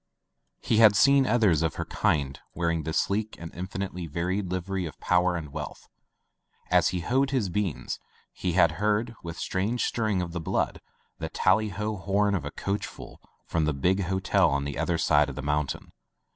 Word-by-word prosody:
He 110 - +1
had 110 -2 +7
seen 140 +1 +5
others 105 -9 +3
of 80 - 0
her - - -3
kind 70 -2 0 0.2
wearing 85 -1 0
the 80 - -2
sleek 105 +6 0
and 85 -1 -9
infinitely 90 -1 -5
varied 90 +5 -2
livery 95 0 -2
of 75 - -11
power 90 0 +2
and 75 -4 -6
wealth. - - -7 0.8
As - - +5
he 90 -1 -1
hoed 135 +8 +1
his 125 -8 0
beans, 95 -3 -2 0.3
he 90 -2 -2
had 85 -2 +5
heard, 105 +3 +1
with 85 -1 -7
strange 105 +6 -1
stirring 110 -5 0
of 90 -1 -3
the 85 0 -4
blood, - - -1 0.4
the - - -3
tally 105 +3 +2
ho 105 +2 -3
horn 100 +3 +1
of 90 -7 -1
a - - -2
coachful 100 +5 -5 0.3
from 80 -2 0
the 75 - +1
big 90 +7 +1
hotel 95 +1 +2
on 70 0 0
the 70 -1 -4
other 85 - +1
side 75 -2 +3
of 70 - -7
the - - -5
mountain. 75 0 -2
90 Hz, 185 wpm, -27 LUFS, 80-105 Hz, 0.8 s, had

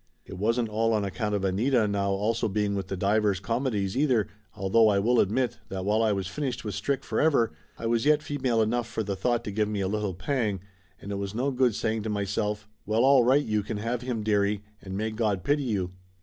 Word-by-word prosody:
It 95 - -9
wasn't 115 +3 +1
all 115 +1 +1
on 105 -2 +1
account 105 +2 -2
of 100 -1 -1
Anita 110 +4 +2
now 100 -1 0
also 105 +4 0
being 105 0 0
with 95 -2 -3
the 95 - -4
Divers 100 0 +2
Comedies, 115 -3 -1
either, 130 -6 +2 0.3
although 105 +3 +4
I 105 -2 +3
will 115 +4 +3
admit 120 +5 +1
that 95 -1 -4
while 105 +2 +2
I 110 -1 +3
was 95 -2 -1
finished 130 +4 -4
with 105 - -3
Strick 135 +6 -1
for - - -1
ever, 140 -7 +3 0.3
I 115 - -6
was 115 0 +1
yet 150 +1 +3
female 130 -6 +1
enough 120 +2 -1
for 110 - -3
the 100 -1 -3
thought 120 +5 0
to 105 - -4
give 105 +1 0
me 105 -1 -2
a 95 - 0
little 105 -2 -2
pang, 105 -2 -1 0.4
and 100 - -8
it 100 - -2
was 100 +1 -4
no 135 +4 0
good 125 -4 +2
saying 110 0 -1
to 110 - -4
myself, 105 +1 -2 0.2
well, 110 +4 +2
all 135 -2 +6
right 135 +4 +4
you 105 -1 +1
can 105 +1 -4
have 115 +3 -2
him, 125 -4 -3
dearie, 105 -1 +1 0.2
and 95 0 -6
may 110 +1 -1
God 105 -5 -1
pity 145 +1 +2
you! 95 -6 -1
110 Hz, 235 wpm, -27 LUFS, 100-120 Hz, 0.4 s, all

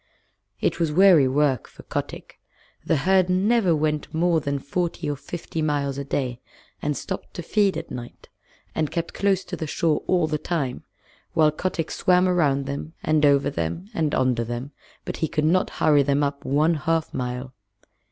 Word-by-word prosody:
It - - 0
was 165 -3 +1
weary 175 -4 +6
work 135 -1 +1
for - - -15
Kotick. - - -6 0.4
The - - +1
herd 190 -1 +4
never 190 -1 +3
went 150 -1 -1
more 165 0 +2
than 140 0 -1
forty 170 +5 -3
or 145 - -1
fifty 160 +2 -6
miles 140 -2 -1
a - - -3
day, 130 -3 -3 0.4
and 150 -1 -1
stopped - - -6
to 175 - -5
feed 200 +2 +2
at - - -7
night, 120 -1 -8 0.5
and 155 -2 0
kept 170 -1 -3
close 195 -2 +1
to - - -6
the 160 - -4
shore 155 0 0
all 180 -3 +3
the 155 -1 -2
time; 145 -8 -2 0.5
while 155 -1 +4
Kotick 165 0 -3
swam 180 0 +3
round 145 -7 +2
them, 140 +3 -5
and 155 -1 +2
over 140 0 +3
them, 135 - -3
and 155 -6 0
under 125 -2 +1
them, 120 +4 -5 0.3
but - - -4
he 160 - 0
could 150 0 -1
not 180 +4 +2
hurry 150 -2 +3
them 140 +1 +1
up 140 0 -3
one 150 +5 +3
half 165 +1 -1
mile. 125 0 -4
150 Hz, 180 wpm, -24 LUFS, 140-170 Hz, 0.5 s, weary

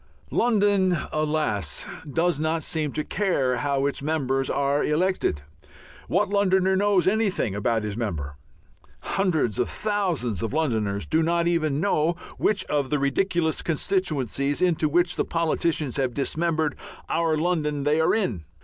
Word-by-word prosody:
London, 200 -6 +2 0.2
alas! 150 - -1 0.2
does 165 0 +1
not 160 +1 0
seem 155 -3 -1
to 155 - -1
care 145 -12 0
how 140 +1 0
its 140 - -1
members 135 -3 -1
are 140 +1 +1
elected. 155 - 0 0.6
What 205 +4 +2
Londoner 190 -2 +2
knows 195 -2 +2
anything 200 - +1
about 110 +2 0
his 105 -1 -3
member? 80 -11 -4 0.7
Hundreds 160 - 0
of 125 - +1
thousands 180 - -1
of 115 - -3
Londoners 110 -10 0
do 160 - +1
not 170 +1 +1
even 155 -4 +1
know 165 -3 +1 0.3
which 200 -3 +1
of 145 -3 -1
the 150 - +1
ridiculous 160 +4 0
constituencies 145 - 0
into 165 -4 +2
which 175 +3 +2
the - - +2
politicians 160 -4 -1
have 130 -3 -1
dismembered 155 +2 0 0.3
our 165 -1 +1
London 150 -3 0
they 150 +2 +2
are 160 - +3
in. 120 - -1
155 Hz, 140 wpm, -25 LUFS, 135-180 Hz, 0.7 s, are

